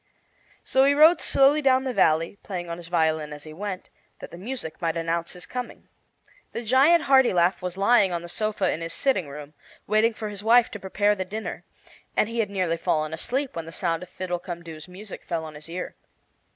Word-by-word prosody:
So 265 - +3
he 285 +1 +4
rode 315 +4 +6
slowly 280 +3 +4
down 260 -2 +3
the 260 -2 -2
valley, 165 0 +2
playing 175 -3 -5
on 170 - -4
his 170 -1 -10
violin 160 -3 0
as 150 0 -9
he 155 - -10
went, 190 +2 -6 0.3
that - - -10
the - - -9
music 215 -6 -6
might 165 -1 0
announce 165 0 -2
his 180 - -9
coming. 250 -1 -7 0.6
The 235 - -4
giant 275 +9 +5
Hartilaf 200 -11 +4
was 180 0 -4
lying 200 -1 +4
on 170 -1 -3
the - - -7
sofa 205 0 -1
in 160 - -4
his 165 0 -4
sitting 190 - 0
room, 145 +1 -9 0.3
waiting 215 +2 +2
for 215 -1 -5
his 205 -1 -5
wife 230 +2 +5
to 205 - -7
prepare 205 +2 +1
the 190 -2 -3
dinner; 215 +4 -6 0.5
and - - +3
he 230 +1 -4
had 215 -3 +1
nearly 185 -4 -1
fallen 155 -1 -1
asleep 260 - -2
when 165 -1 -4
the - - -8
sound 165 -1 -1
of 180 - -9
Fiddlecumdoo's 170 -3 -6
music 190 +3 -10
fell 165 -2 -3
on 155 - -9
his 150 +2 -12
ear. 180 +2 -5
185 Hz, 205 wpm, -25 LUFS, 165-230 Hz, 0.6 s, rode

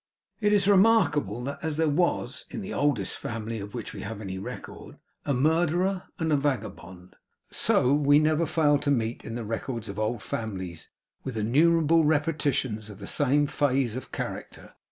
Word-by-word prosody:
It 210 -2 +2
is 200 -2 +3
remarkable 180 - +3
that 140 +2 -5
as 160 -2 -2
there 160 0 +2
was, 150 -4 0
in - - -5
the 200 +1 -6
oldest 140 -10 0
family 110 0 -5
of 100 +3 -8
which 115 - -6
we - - -7
have 105 0 -6
any 95 -3 -5
record, 95 - -9 0.3
a 140 - +1
murderer 175 +6 +1
and 160 -2 0
a - - +6
vagabond, 105 -10 -4 0.4
so 125 +2 +3
we 145 0 +5
never 155 +2 +2
fail 150 -3 +3
to 145 - -2
meet, 115 -4 0
in 115 - -6
the 120 -2 -4
records 115 0 -4
of 100 +1 -5
all 110 +2 +1
old 115 - -10
families, 95 -6 -5 0.3
with 130 -4 -5
innumerable 160 +8 +4
repetitions 145 -8 0
of 105 - -10
the - - -8
same 145 +1 +2
phase 135 -5 0
of 130 - -7
character. - - -6
140 Hz, 175 wpm, -27 LUFS, 110-160 Hz, 0.4 s, a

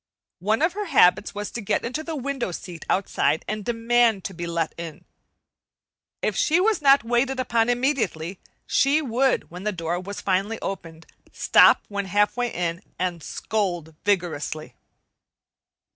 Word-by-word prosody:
One 215 - +1
of 335 +1 +2
her 415 +1 -3
habits 210 - +4
was 205 0 -4
to 235 - -5
get 205 - -1
on 235 - -3
the 315 +4 -4
window 275 -6 -3
seat 175 -1 -8
outside 160 -5 +1
and 215 0 -3
demand 230 -2 +2
to 195 - -5
be 170 0 -5
let 170 -1 -1
in. 165 -2 -8 1.2
If - - 0
she 330 +1 +3
was 420 -1 +2
not 275 -2 +6
waited 245 +3 0
upon 235 -2 +1
immediately, 245 - -1 0.3
she 290 +3 +2
would, 260 - +1
when 180 +1 -8
the 210 - 0
door 170 -1 -2
was 200 +2 -6
finally 195 +4 0
opened, 165 -4 -6 0.3
stop - - +5
when 200 -1 -3
halfway 205 +5 +1
in 170 0 -2 0.2
and 175 -2 -2
scold 175 -5 -3
vigorously. 170 -6 -1
205 Hz, 150 wpm, -24 LUFS, 175-245 Hz, 1.2 s, not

